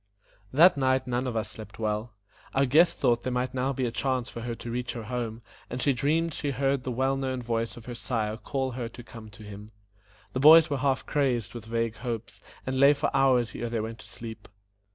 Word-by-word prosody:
That 165 Hz, +4 st, +6 dB
night 130 Hz, -1 st, +2 dB
none 125 Hz, +1 st, -1 dB
of 120 Hz, -, -3 dB
us 110 Hz, -1 st, -2 dB
slept 110 Hz, -, -10 dB
well; 110 Hz, +1 st, -2 dB, 0.4 s
our 135 Hz, +1 st, +4 dB
guest 160 Hz, +7 st, +4 dB
thought 120 Hz, -3 st, +2 dB
there 130 Hz, -, -3 dB
might 125 Hz, 0 st, -1 dB
now 130 Hz, +1 st, 0 dB
be 130 Hz, -1 st, -1 dB
a 120 Hz, -, -1 dB
chance 130 Hz, -1 st, -1 dB
for 115 Hz, -, -7 dB
her 120 Hz, 0 st, -4 dB
to 115 Hz, -, -7 dB
reach 125 Hz, +1 st, -3 dB
her 115 Hz, -, -6 dB
home, 115 Hz, 0 st, -4 dB, 0.3 s
and 125 Hz, -, -4 dB
she 140 Hz, +2 st, +3 dB
dreamed 155 Hz, +6 st, +1 dB
she 145 Hz, -, -2 dB
heard 135 Hz, 0 st, 0 dB
the 130 Hz, -, -4 dB
well 130 Hz, +3 st, +1 dB
known 130 Hz, -1 st, -2 dB
voice 115 Hz, -1 st, -2 dB
of 115 Hz, -, -11 dB
her 125 Hz, -, -6 dB
sire 110 Hz, -2 st, -2 dB
call 130 Hz, +1 st, -2 dB
her 120 Hz, -1 st, -4 dB
to 120 Hz, +1 st, -11 dB
come 115 Hz, -2 st, -11 dB
to 105 Hz, +1 st, -14 dB
him. 105 Hz, 0 st, -10 dB, 0.6 s
The 130 Hz, -, -1 dB
boys 155 Hz, +2 st, +8 dB
were 140 Hz, -, 0 dB
half 135 Hz, 0 st, 0 dB
crazed 130 Hz, -7 st, 0 dB
with 120 Hz, -2 st, -8 dB
vague 115 Hz, -1 st, -2 dB
hopes, 115 Hz, -1 st, -5 dB, 0.2 s
and 130 Hz, 0 st, -1 dB
lay 140 Hz, +2 st, +7 dB
for 145 Hz, 0 st, -2 dB
hours 125 Hz, -5 st, +3 dB
ere 120 Hz, -, -4 dB
they 115 Hz, -1 st, -1 dB
went 115 Hz, +1 st, -5 dB
to -, -, -12 dB
sleep. 115 Hz, -1 st, -9 dB
125 Hz, 230 wpm, -27 LUFS, 115-135 Hz, 0.6 s, boys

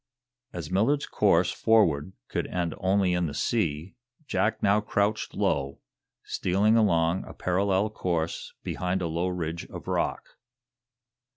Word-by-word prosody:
As 85 Hz, -2 st, -6 dB
Millard's 115 Hz, +10 st, +2 dB
course -, -, +3 dB
forward 95 Hz, -7 st, +2 dB
could -, -, -2 dB
end 85 Hz, -2 st, -2 dB
only 95 Hz, -1 st, +2 dB
in 90 Hz, -1 st, +1 dB
the 75 Hz, -, -6 dB
sea, 85 Hz, -6 st, -1 dB, 0.3 s
Jack 110 Hz, -5 st, 0 dB
now 100 Hz, +1 st, +4 dB
crouched 105 Hz, +1 st, -1 dB
low, 70 Hz, -1 st, 0 dB, 0.5 s
stealing 100 Hz, +5 st, +1 dB
along 85 Hz, -5 st, +2 dB
a -, -, -11 dB
parallel 95 Hz, +3 st, +1 dB
course 85 Hz, -5 st, -3 dB
behind 90 Hz, +1 st, -2 dB
a -, -, 0 dB
low 85 Hz, +3 st, -1 dB
ridge 85 Hz, -2 st, -3 dB
of -, -, -10 dB
rock. -, -, -1 dB
90 Hz, 130 wpm, -27 LUFS, 85-100 Hz, 0.5 s, now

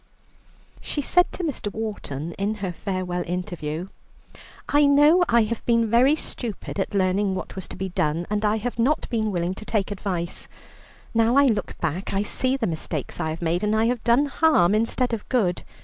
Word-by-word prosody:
She -, -, -3 dB
said 355 Hz, +4 st, +3 dB
to 370 Hz, -, -4 dB
Mr. 275 Hz, -10 st, -3 dB
Wharton 180 Hz, -9 st, -5 dB
in 205 Hz, +2 st, 0 dB
her 195 Hz, -3 st, -3 dB
farewell 180 Hz, -1 st, -3 dB
interview: 175 Hz, -1 st, -4 dB, 0.8 s
"I 290 Hz, 0 st, +4 dB
know 295 Hz, +5 st, +6 dB
I 235 Hz, -1 st, +5 dB
have 220 Hz, +1 st, -3 dB
been 230 Hz, -2 st, +2 dB
very 255 Hz, +6 st, +5 dB
stupid 230 Hz, -9 st, -6 dB
at 195 Hz, -, -2 dB
learning 190 Hz, +1 st, +1 dB
what -, -, -6 dB
was 190 Hz, -2 st, -5 dB
to -, -, -9 dB
be 190 Hz, 0 st, -4 dB
done, 165 Hz, -1 st, -1 dB
and 210 Hz, 0 st, -1 dB
I 210 Hz, +1 st, +2 dB
have 235 Hz, +2 st, -4 dB
not 275 Hz, +7 st, +2 dB
been 220 Hz, -2 st, 0 dB
willing 175 Hz, -1 st, -1 dB
to 195 Hz, -, -9 dB
take 210 Hz, -2 st, -1 dB
advice. 185 Hz, -4 st, -4 dB, 0.7 s
Now 230 Hz, +1 st, +3 dB
I 280 Hz, 0 st, +6 dB
look 220 Hz, -6 st, 0 dB
back, 175 Hz, +4 st, -3 dB
I 195 Hz, -, +1 dB
see 255 Hz, +5 st, 0 dB
the 245 Hz, -, -1 dB
mistakes 155 Hz, -, -4 dB
I 160 Hz, -, -1 dB
have 160 Hz, +2 st, -5 dB
made, 170 Hz, +3 st, 0 dB
and 210 Hz, +1 st, +2 dB
I 220 Hz, +1 st, +3 dB
have 245 Hz, 0 st, 0 dB
done 240 Hz, +5 st, +4 dB
harm 275 Hz, -, +3 dB
instead 230 Hz, +3 st, 0 dB
of 220 Hz, -, -4 dB
good. 195 Hz, -9 st, +1 dB
210 Hz, 195 wpm, -24 LUFS, 180-235 Hz, 0.8 s, know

